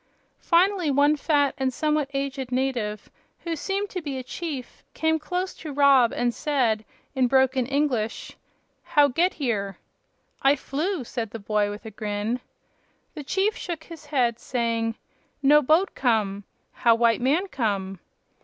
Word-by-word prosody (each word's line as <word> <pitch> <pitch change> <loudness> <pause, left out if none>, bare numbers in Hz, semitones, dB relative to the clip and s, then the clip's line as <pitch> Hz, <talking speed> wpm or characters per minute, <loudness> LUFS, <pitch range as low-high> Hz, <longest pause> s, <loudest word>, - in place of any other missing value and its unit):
Finally 360 -1 +3
one 285 +2 +4
fat 285 -2 +2
and 265 -1 +1
somewhat 300 +1 0
aged 275 -2 -3
native, 250 -5 -2 0.3
who 335 -1 -3
seemed 390 +6 -2
to 370 -2 -5
be 285 -4 -4
a 260 - -5
chief, 275 -2 -6
came 320 0 +1
close 360 +5 -3
to 310 - -8
Rob 275 -4 +5
and 240 -1 0
said, 245 -8 0 0.3
in 260 -2 +2
broken 260 -1 +3
English: 265 -6 -1 0.5
"How 290 -2 +4
get 345 +8 +1
here?" 210 -9 -2 0.6
"I 275 +1 +5
flew," 305 +4 -2
said 230 -2 -4
the 225 - -6
boy, 210 0 0
with 205 +2 -8
a 220 - -7
grin. 210 +3 -2 0.7
The 305 -4 -7
chief 390 +9 0
shook 335 -3 -5
his 320 -3 -12
head, 245 -5 +1
saying: 230 -2 -1 0.5
"No 295 +2 +6
boat 315 +8 +3
come. 210 -5 0 0.3
How 230 -1 +3
white 230 0 +2
man 295 +9 +2
come?" 200 - -2
270 Hz, 150 wpm, -25 LUFS, 230-305 Hz, 0.7 s, No